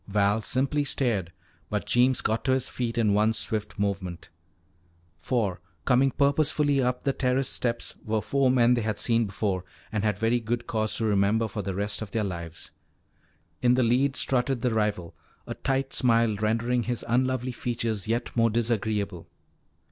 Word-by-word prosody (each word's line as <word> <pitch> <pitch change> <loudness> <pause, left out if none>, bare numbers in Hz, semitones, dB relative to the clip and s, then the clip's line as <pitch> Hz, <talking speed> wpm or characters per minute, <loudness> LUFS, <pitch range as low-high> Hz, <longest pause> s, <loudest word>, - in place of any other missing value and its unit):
Val 105 +1 +2
simply 135 +6 +1
stared, 115 -11 0 0.4
but 105 -1 -2
Jeems 125 +1 +3
got 110 +1 -1
to 130 - +2
his 130 0 0
feet 120 -2 -3
in 110 -3 +3
one 105 +2 +3
swift 110 -1 -3
movement. 95 -4 -3 0.9
For, 100 -4 -1 0.2
coming 130 +2 +4
purposefully 140 0 +2
up 125 0 -1
the 140 - +1
terrace 130 +1 0
steps, 120 -1 -2
were 110 0 0
four 135 +3 +2
men 125 -1 +4
they 120 - +1
had 110 -2 -2
seen 115 -2 +1
before 95 -2 -2 0.3
and 105 -2 -1
had 105 -3 +1
very 115 +3 +2
good 120 +1 -3
cause 110 -2 -1
to 115 - -1
remember 105 +2 +2
for 105 0 -4
the 95 -1 -4
rest 100 +2 -2
of 110 - -5
their 110 +1 -1
lives. 85 -4 -5 0.9
In 125 0 +4
the 130 - +3
lead 130 +4 +2
strutted 130 -1 0
the 125 -2 +1
rival, 105 -6 -1 0.3
a - - -5
tight 135 0 -1
smile 115 -3 +3
rendering 115 +4 0
his 120 +1 -3
unlovely 130 +1 +1
features 115 -4 -3
yet 115 +2 -2
more 115 -1 +4
disagreeable. 110 -5 -1
115 Hz, 170 wpm, -27 LUFS, 105-125 Hz, 0.9 s, coming